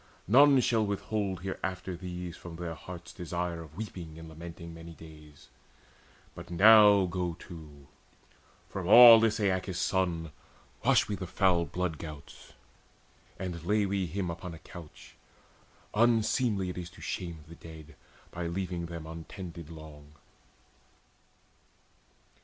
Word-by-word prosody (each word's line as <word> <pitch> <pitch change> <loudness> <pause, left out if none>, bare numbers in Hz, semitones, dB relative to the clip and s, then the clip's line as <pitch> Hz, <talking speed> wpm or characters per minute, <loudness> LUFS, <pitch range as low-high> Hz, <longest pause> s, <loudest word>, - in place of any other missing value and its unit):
None 135 +5 +7
shall 115 -2 +2
withhold 100 -2 -2
Hereafter 95 -1 -4
these 90 -1 -6
from 85 - -10
all - - -9
their 85 -1 -5
heart's 85 0 -10
desire 85 -1 -4
Of 80 0 -13
weeping 90 -7 -7
and 80 0 -10
lamenting 85 +1 -9
many 85 0 -11
days. 75 -2 -15 0.9
But - - -11
now 105 +1 +7
go 90 -1 -3
to, 75 -5 -12 0.8
from 95 -3 -5
aweless 115 0 +9
Aeacus' 95 -2 -1
son 85 -5 -1 0.5
Wash - - +4
we 105 - -3
the 95 -2 -5
foul 90 -2 +2
blood 90 -4 -3
gouts, 75 -3 -10 0.8
and 90 -3 -5
lay 105 +3 +2
we 95 -2 -1
him 90 +1 -3
Upon 85 0 -7
a 80 - -16
couch: 85 -4 -12 0.8
unseemly 110 -3 +2
it 90 - -7
is 85 -1 -7
to - - -16
shame 85 -4 -5
The 80 - -12
dead 80 -2 -12 0.4
by 85 -1 -4
leaving 85 -1 -3
them 85 -1 -7
untended 85 0 -9
long." 75 -2 -12
90 Hz, 130 wpm, -30 LUFS, 80-95 Hz, 0.9 s, aweless